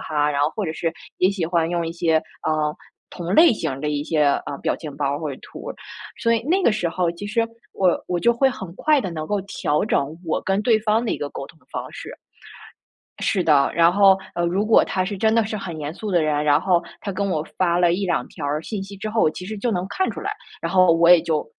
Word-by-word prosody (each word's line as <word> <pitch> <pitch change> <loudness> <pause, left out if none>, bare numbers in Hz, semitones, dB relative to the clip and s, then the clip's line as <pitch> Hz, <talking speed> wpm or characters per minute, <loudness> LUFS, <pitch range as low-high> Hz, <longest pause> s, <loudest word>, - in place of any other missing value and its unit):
哈”， 150 -1 0
然 140 - 0
后 145 - +3
或 210 - -1
者 160 - -2
是 165 +1 -2 0.3
也 185 - +4
喜 195 -4 -2
欢 165 -1 +1
用 170 -1 -1
一 165 - -4
些， 170 -1 0 0.3
呃， 155 -1 0 0.4
同 175 +2 -4
类 325 -3 +7
型 215 - -2
儿 135 - -5
的 150 - 0
一 145 -1 -1
些， 155 0 +1 0.2
呃 140 - -4
表 - - +1
情 150 -4 -8
包 140 -1 -1
或 155 -2 -4
者 135 - -7
图。 - - -9 0.5
所 230 - +1
以 230 -1 +1
那 380 +3 +2
个 235 - +4
时 180 -5 -1
候 175 0 0
其 190 +4 -7
实 230 +2 0 0.3
我 185 -3 +2
我 180 - -1
就 235 +7 +3
会 265 +3 +3
很 190 -8 -7
快 305 -2 +3
地 190 -8 -2
能 155 -2 -5
够 205 +2 -1
调 185 -4 -1
整 150 -6 -1
我 160 - -1
跟 195 +2 0
对 225 -1 +4
方 220 +2 +1
的 230 - -1
一 - - -2
个 145 - -3
沟 135 - -7
通 160 - -18
的 - - -31
方 - - -5
式。 - - -8 1.1
是 190 - +1
的， 145 -3 +4
然 170 0 +5
后， 195 0 +6 0.2
呃 175 - 0
如 190 +4 0
果 220 0 +5
他 185 -1 -1
是 200 +2 -4
真 220 +2 +2
的 230 - +3
是 215 0 -4
很 175 -5 -6
严 150 0 -4
肃 210 +4 -6
的 175 -3 +3
人， 150 -1 +1
然 145 +1 +4
后 180 -3 +2 0.2
他 200 - -4
跟 200 +1 -1
我 155 -5 -1
发 175 -2 +2
了 175 -1 +4
1-2 175 -8 -1
条 145 - -6
儿 150 +2 -1
信 210 0 -4
息 195 +1 -9
之 215 +2 -5
后， 220 -7 +3
其 180 - -8
实 215 +2 -6
就 240 +3 -1
能 185 -3 -1
看 375 - -1
出 - - -7
来。 - - -3 0.3
然 - - -3
后 185 -2 +6
我 170 +1 +5
也 175 - +8
就， 160 -2 -1
175 Hz, 280 characters per minute, -22 LUFS, 155-205 Hz, 1.1 s, 也